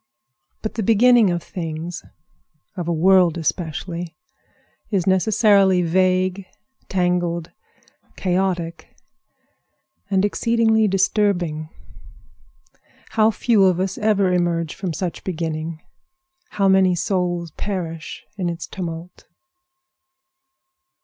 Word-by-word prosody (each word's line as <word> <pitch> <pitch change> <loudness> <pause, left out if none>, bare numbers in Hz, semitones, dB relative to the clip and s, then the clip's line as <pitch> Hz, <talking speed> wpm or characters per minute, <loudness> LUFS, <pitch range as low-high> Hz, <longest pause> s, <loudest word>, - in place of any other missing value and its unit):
But 215 - -3
the 225 - -3
beginning 230 +1 +5
of 175 -2 -2
things, 165 -1 -6 0.7
of 175 -3 -4
a - - 0
world 175 0 +4
especially, 170 +1 -4 0.7
is 195 -5 0
necessarily 190 -1 +4
vague, 185 +2 +1 0.4
tangled, 175 -2 0 0.6
chaotic, 180 -2 -2 1.1
and 195 0 +2
exceedingly 220 0 +2
disturbing. 185 -5 0 1.4
How 220 -1 +4
few 220 -2 +3
of 180 -2 +2
us 190 0 -2
ever 200 -4 +2
emerge 170 -3 0
from 190 -3 -4
such 170 +2 -4
beginning! 160 -2 -4 0.7
How 195 -1 +1
many 190 -1 +4
souls 175 -2 -1
perish 165 -4 -5
in 180 -3 -1
its 170 0 -5
tumult! 170 -1 -7
180 Hz, 95 wpm, -21 LUFS, 170-195 Hz, 1.4 s, beginning